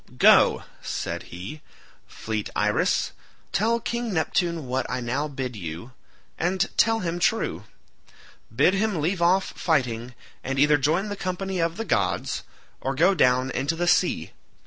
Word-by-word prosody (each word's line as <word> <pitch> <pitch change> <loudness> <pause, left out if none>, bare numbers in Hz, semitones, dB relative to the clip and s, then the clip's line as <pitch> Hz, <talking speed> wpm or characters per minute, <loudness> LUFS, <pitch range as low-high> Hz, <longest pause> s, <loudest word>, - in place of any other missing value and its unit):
"Go," - - +6 0.2
said - - -3
he, 95 - -8 0.5
"fleet 110 -2 -4
Iris, - - +1 0.4
tell 230 +5 +2
King 235 0 -3
Neptune 170 -2 0
what 130 0 -2
I 125 - -2
now 130 +5 -1
bid 130 -4 -5
you—and 130 - -4
tell 225 0 +3
him 175 -1 -2
true. 225 +5 0 0.9
Bid 185 - +4
him 200 -3 0
leave 170 +4 -1
off 185 +3 +3
fighting, 125 -6 -1 0.3
and 135 +1 -3
either 145 +2 +5
join 165 +9 +1
the 205 - -3
company 190 0 -3
of 165 +1 0
the 225 - -3
gods, - - 0 0.4
or 135 +1 -2
go 175 +7 +4
down 130 -5 +3
into 140 +6 -1
the 175 +1 -1
sea. 175 - +2
160 Hz, 145 wpm, -25 LUFS, 130-190 Hz, 0.9 s, Go